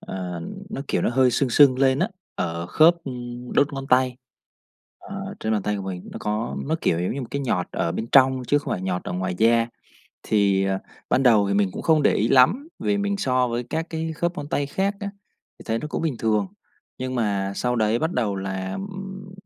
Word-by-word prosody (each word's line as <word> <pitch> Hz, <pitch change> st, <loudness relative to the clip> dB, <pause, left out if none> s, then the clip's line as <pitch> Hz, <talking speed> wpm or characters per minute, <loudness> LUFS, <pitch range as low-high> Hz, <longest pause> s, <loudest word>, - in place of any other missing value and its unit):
Ờ, 90 Hz, -3 st, -5 dB, 0.3 s
nó, -, -, -4 dB
kiểu, -, -, 0 dB
nó -, -, +2 dB
hơi 130 Hz, +1 st, +4 dB
sưng 130 Hz, +1 st, +1 dB
sưng 130 Hz, +1 st, +6 dB
lên 135 Hz, 0 st, +3 dB
á 185 Hz, -, +1 dB, 0.3 s
ở 85 Hz, +1 st, -3 dB
khớp, 160 Hz, -, +5 dB
ừm, 125 Hz, -1 st, -7 dB
đốt 145 Hz, +1 st, +3 dB
ngón 135 Hz, -1 st, -5 dB
tay, 125 Hz, 0 st, +3 dB, 0.8 s
ờ, -, -, -7 dB
trên 110 Hz, -, -1 dB
bàn 105 Hz, -3 st, 0 dB
tay 105 Hz, 0 st, -1 dB
của 100 Hz, -, -5 dB
mình 95 Hz, -2 st, -6 dB
nó -, -, -7 dB
có, 105 Hz, +2 st, -2 dB
nó, 160 Hz, +3 st, 0 dB
kiểu, 85 Hz, -, +1 dB
giống 90 Hz, -, -1 dB
như 140 Hz, -, -3 dB
một 120 Hz, -, -7 dB
cái 140 Hz, -, -2 dB
nhọt 105 Hz, -10 st, 0 dB
ở 85 Hz, -, -1 dB
bên 110 Hz, +6 st, -3 dB
trong 130 Hz, -1 st, +5 dB
chứ 145 Hz, -, +4 dB
không 145 Hz, -, -4 dB
phải 90 Hz, -, -3 dB
nhọt 90 Hz, -1 st, -2 dB
ở -, -, -4 dB
ngoài 90 Hz, 0 st, -2 dB
da. 115 Hz, +1 st, +4 dB, 0.6 s
Thì, 100 Hz, -2 st, +2 dB
ờ, 95 Hz, 0 st, 0 dB, 0.3 s
ban 130 Hz, -, +3 dB
đầu 110 Hz, -6 st, +5 dB
thì 100 Hz, -, +1 dB
mình 100 Hz, -1 st, +2 dB
cũng -, -, -6 dB
không 155 Hz, -2 st, +3 dB
để -, -, +4 dB
ý 110 Hz, -, +1 dB
lắm, 155 Hz, -, +4 dB
vì 205 Hz, -, 0 dB
mình 200 Hz, 0 st, 0 dB
so 130 Hz, -7 st, +1 dB
với 120 Hz, +1 st, -2 dB
các 160 Hz, +1 st, -1 dB
cái 160 Hz, 0 st, -3 dB
khớp 170 Hz, +3 st, -2 dB
ngón 145 Hz, -, -5 dB
tay 145 Hz, -1 st, 0 dB
khác 195 Hz, +7 st, -1 dB
á 200 Hz, -1 st, -3 dB, 0.5 s
thì -, -, -11 dB
thấy 115 Hz, 0 st, 0 dB
nó 150 Hz, -, -5 dB
cũng -, -, -3 dB
bình 155 Hz, -6 st, -1 dB
thường, 105 Hz, -3 st, +1 dB, 0.5 s
nhưng 130 Hz, 0 st, -3 dB
mà 100 Hz, -5 st, 0 dB
sau 125 Hz, 0 st, 0 dB
đấy 110 Hz, 0 st, +2 dB
bắt 160 Hz, +5 st, -1 dB
đầu 105 Hz, -5 st, 0 dB
là, 95 Hz, -1 st, -4 dB
ừm, 195 Hz, -1 st, -7 dB
125 Hz, 235 wpm, -24 LUFS, 100-145 Hz, 0.8 s, sưng